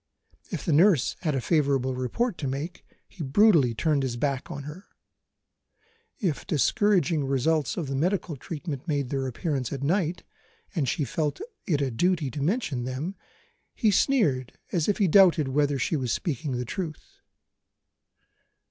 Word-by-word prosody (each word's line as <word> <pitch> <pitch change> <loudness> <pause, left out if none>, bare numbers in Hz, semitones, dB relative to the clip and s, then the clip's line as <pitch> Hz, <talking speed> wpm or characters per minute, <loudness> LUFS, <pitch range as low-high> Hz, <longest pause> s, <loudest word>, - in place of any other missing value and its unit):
If - - -5
the 165 - +2
nurse 165 - +4
had 155 -5 -1
a - - +1
favourable 140 -4 +1
report 150 - -2
to 140 - -2
make, 145 +7 -4 0.2
he 185 - -11
brutally 140 - +4
turned 150 +3 +1
his 125 -3 -2
back 135 0 -2
on 140 - -6
her. 150 +7 -9 1.3
If 165 - -2
discouraging 170 - +2
results 140 +3 0
of 170 - -2
the 135 - -4
medical 170 +3 0
treatment 150 +1 -6
made 140 -5 -1
their 135 -1 -1
appearance 135 0 -2
at 140 -1 -4
night, 175 +2 0 0.5
and 150 -9 0
she 145 - -1
felt 150 +1 -2 0.3
it 150 -7 +1
a 135 -2 0
duty 155 +3 +1
to 145 - -5
mention 155 - -1
them, 135 +9 -3 0.6
he 220 - +3
sneered 170 - +2 0.2
as 170 -4 0
if 205 - +2
he 200 - +3
doubted 170 -5 +5
whether 145 +1 +1
she 135 - 0
was 130 -5 -1
speaking 145 - -2
the 125 0 -2
truth. 155 +4 -6
150 Hz, 155 wpm, -26 LUFS, 135-175 Hz, 1.3 s, doubted